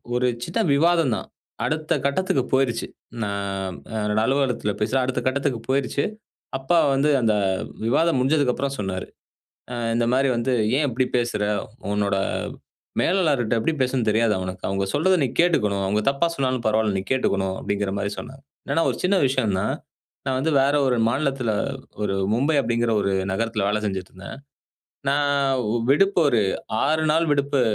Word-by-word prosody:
ஒரு 125 0 +2 0.2
சின்ன 230 - -2
விவாதம் 165 -2 +3
தான். 95 - -6 0.4
அடுத்த 155 0 -1
கட்டத்துக்கு 140 -2 +1
போயிருச்சு. 130 -3 +1 0.4
நான் 100 -2 -3 0.3
என்னோட 105 0 0
அலுவலகத்தில 130 -5 0
பேசுறேன். 125 +4 +1
அடுத்த 130 - -2
கட்டத்துக்கு 135 -2 0
போயிருச்சு. 135 +1 +1 0.5
அப்பா 135 +6 +1 0.2
வந்து 140 +3 +2
அந்த 110 -2 +3 0.5
விவாதம் 160 +5 +2
முடிஞ்சதுக்கு 135 -1 +2
அப்புறம் 140 +1 -2
சொன்னாரு. 95 -2 -3 0.7
ஆ - - -3 0.2
இந்தமாரி 125 +4 +2
வந்து, 120 +2 0 0.3
"ஏன் 150 - +2
இப்பிடி 130 +1 0
பேசுற? 120 -4 0 0.5
உன்னோட 100 -1 +1 0.9
மேலாளர்ட்ட 150 - +2
எப்பிடி 155 +8 0
பேசணுன்னு 125 -3 +1
தெரியாதா 110 0 +2
உனக்கு? 90 0 -7
அவுங்க 95 0 0
சொல்றத 185 +5 +3
நீ 135 - +2
கேட்டுக்கணும். 105 - +2
அவுங்க 105 +3 +1
தப்பா 140 +5 +1
சொன்னாலும் 130 -4 -1
பரவாயில. 110 -2 +1
நீ 95 - -2
கேட்டுக்கணும்." 95 -7 +1
அப்பிடிங்கிறமாரி 100 0 -2
சொன்னாரு. 135 +1 -10 0.3
ஏன்னா 165 +3 +2
ஒரு - - -6
சின்ன 190 +2 +3
விஷயம் 115 -7 0
தான், - - 0 0.5
நான் 130 -1 +1
வந்து 160 +4 0
வேற 140 +2 +2
ஒரு 125 - +2
மாநிலத்தில 135 -3 0 0.5
ஒரு 95 -1 0 0.2
மும்பை 140 +6 +2
அப்பிடிங்கிற 115 -2 0
ஒரு 100 0 0 0.2
நகரத்தில 110 -1 -1
வேலை 105 +1 0
செஞ்சுட்டு 95 -2 -4
இருந்தேன். 95 +8 -9 0.7
நான் 145 0 +2 0.5
விடுப்பு 195 +6 +3
ஒரு 115 - +3 0.4
6 155 +2 +1
நாள் 165 +1 +2
விடுப்பு 140 -1 +1
125 Hz, 150 wpm, -23 LUFS, 105-140 Hz, 0.9 s, விவாதம்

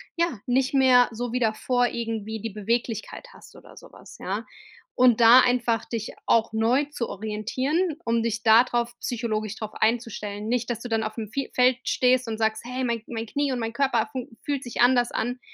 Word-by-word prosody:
ja, 335 -9 -1
nicht 260 +2 +1
mehr 255 -2 +5
so 240 +1 -5
wie 250 - 0
davor 245 +2 +1
irgendwie 220 -2 -4
die 225 - -4
Beweglichkeit 225 - -3
hast - - -16
oder - - -16
so - - -13
was, - - -14
ja? - - -4 0.5
Und 245 -2 +4
da 230 +2 +9
einfach 240 -2 +1
dich 225 -2 -5 0.2
auch 230 -1 +3
neu 230 +6 +2
zu 235 -5 -3
orientieren, 260 - -2
um 230 0 +1
dich 230 -1 -2
da 225 +1 +7
drauf 240 -1 -2
psychologisch 215 -3 -3
drauf 215 -1 -6
einzustellen. 220 -2 -2
Nicht, 245 -1 -1
dass 235 -1 -3
du 245 - -7
dann 225 -1 +1
auf 215 0 -5
dem 220 -3 -5
Fie 275 +3 -3
Feld 250 0 +4
stehst 255 0 +2
und 220 -1 -3
sagst: 220 -1 0
„Hey, 250 +1 -4
mein 235 -2 -1
mein 225 -1 -4
Knie 285 +3 -1
und 245 - -3
mein 225 0 -3
Körper 275 +2 +1
funk 255 -3 -6
fühlt 285 -3 -2
sich 240 -1 -4
anders 245 -1 +4
an.“ 245 +2 -2
235 Hz, 200 wpm, -25 LUFS, 220-250 Hz, 0.5 s, da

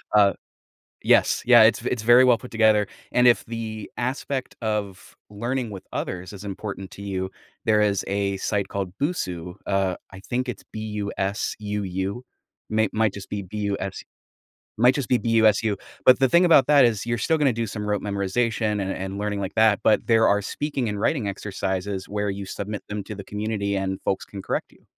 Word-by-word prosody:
Uh 100 -1 +6 0.7
Yes, - - +4
yeah, 120 -2 +8
it's 110 - +4
it's 120 -4 -1
very 120 +3 +7
well 125 -2 +5
put 125 - -11
together, 110 -2 +3 0.2
and 125 0 +4
if 120 - +5
the 110 -2 -6
aspect 130 +1 -3
of 105 -3 -3
learning 120 +3 -3
with 95 -2 -8
others 90 +1 -4
is 100 0 -9
important 95 -1 -6
to 100 - -11
you, 95 -2 -3 0.4
there 105 -1 +4
is 100 -2 +1
a 100 0 -1
site 100 0 -1
called 95 -2 -4
Busuu, 90 - -2
uh, 95 -2 0 0.2
I 95 - -10
think 125 +4 -2
it's 125 - -6
B-U-S-U-U. 105 0 -3 0.5
May 110 0 +2
might 110 -2 +2
just 100 -2 -9
be 100 -1 -3
B-U-S 100 0 -4 0.8
might 125 +3 +5
just 140 -4 -2
be 125 - +4
B-U-S-U, 110 -2 +3 0.3
but, 130 - +7
the 135 - +4
thing 175 +1 +5
about 160 -6 +6
that 145 -3 +6
is 110 -2 0
you're 120 0 -1
still 160 +9 +1
gonna 140 -5 +3
do 115 -1 -2
some 105 +1 -5
rote 105 -1 0
memorization 105 +1 0
and 95 0 -2
and 95 +1 -5
learning 105 -1 -2
like 95 0 -5
that, 110 -1 +4
but 110 - +3
there 115 -1 +5
are 105 0 +3
speaking 135 +2 -3
and 105 -1 -3
writing 130 -10 +1
exercises 95 -1 -3
where 105 0 -2
you 100 0 -4
submit 100 +2 -5
them 105 -1 -4
to 105 - -7
the 100 - -8
community 105 -1 -2
and 95 0 -2
folks 95 - 0
can 100 -1 -8
correct - - -3
you. - - -24
105 Hz, 185 wpm, -24 LUFS, 100-115 Hz, 0.8 s, yeah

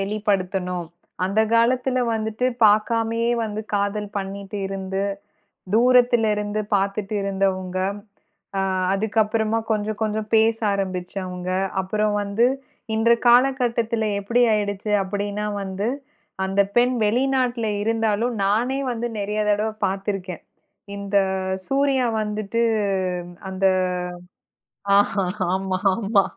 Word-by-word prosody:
வெளிப்படுத்தணும். 195 -3 -1 0.4
அந்த 200 +4 +1
காலத்தில 250 +2 +2
வந்துட்டு 220 +2 -1 0.2
பார்க்காமயே 225 +2 +3
வந்து 215 -1 -4
காதல் 205 +1 -1
பண்ணிட்டு 200 +1 -6
இருந்து, 195 0 -3 0.7
தூரத்திலயிருந்து 225 -4 +3
பார்த்துட்டு 200 +1 -1
இருந்தவங்க. 190 -2 -1 0.8
அ - - +2 0.3
அதுக்கப்புறமா 220 +2 +1
கொஞ்சம், 215 0 -2
கொஞ்சம் 215 0 -2
பேச 220 +1 +3
ஆரம்பிச்சவங்க. 185 -1 -4 0.3
அப்புறம் 210 +2 0
வந்து, 205 +4 +2 0.5
இந்த 225 +1 +3 0.2
காலகட்டத்தில 240 -3 +3
எப்படி 235 +5 +2
ஆயிடுச்சு 205 0 -2
அப்படின்னா 205 +2 -3 0.2
வந்து, 195 +3 -3 0.6
அந்த 195 +1 +1 0.2
பெண் 250 +1 +3
வெளிநாட்டில 250 0 +1 0.2
இருந்தாலும் 225 +1 0
நானே 245 +7 +1
வந்து 240 0 -3
நிறைய 210 +1 -2
தடவை 210 +1 0
பார்த்திருக்கேன். 195 -2 -3 0.5
இந்த 200 0 -2 0.5
சூர்யா 270 -2 +2 0.2
வந்துட்டு 210 +2 -2 0.9
அந்த 190 0 0 1.3
ஆ - - +7 0.6
ஆமா 190 0 -1 0.2
ஆமா. 205 -2 +2
210 Hz, 95 wpm, -23 LUFS, 195-230 Hz, 1.3 s, ஆ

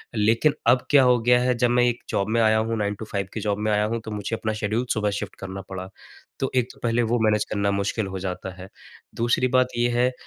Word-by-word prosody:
लेकिन 115 +8 +3
अब 125 +1 +4
क्या 140 -3 +6
हो 125 -1 +5
गया 125 +1 +4
है, 125 0 +1
जब 120 0 +2
मैं 120 0 +3
एक 120 0 +1
जॉब 100 +1 -1
में 115 +1 +2
आया 110 -1 +4
हूँ, 110 +1 -1
9 105 -1 -1
टू 110 - -5
5 100 -1 -2
की - - -3
जॉब 100 -1 -1
में 110 0 0
आया 105 0 +2
हूँ, 115 +2 -2
तो 110 - -6
मुझे 105 +2 -3
अपना 110 -1 -2
शेड्यूल 110 +4 0
सुबह 105 -1 0
शिफ्ट - - -7
करना 95 0 -6
पड़ा। 95 -1 -6 0.5
तो 135 - -1
एक 125 -2 +2
तो - - -19
पहले 120 0 +1
वो 120 - +2
मैनेज 105 -1 +2
करना 100 -1 0
मुश्किल 100 +1 -1
हो 95 0 -5
जाता 95 0 -4
है। 95 - -10 0.5
दूसरी 120 +2 +1
बात 130 0 +3
ये 120 0 +2
है, 125 +2 +2
110 Hz, 255 wpm, -24 LUFS, 105-120 Hz, 0.5 s, क्या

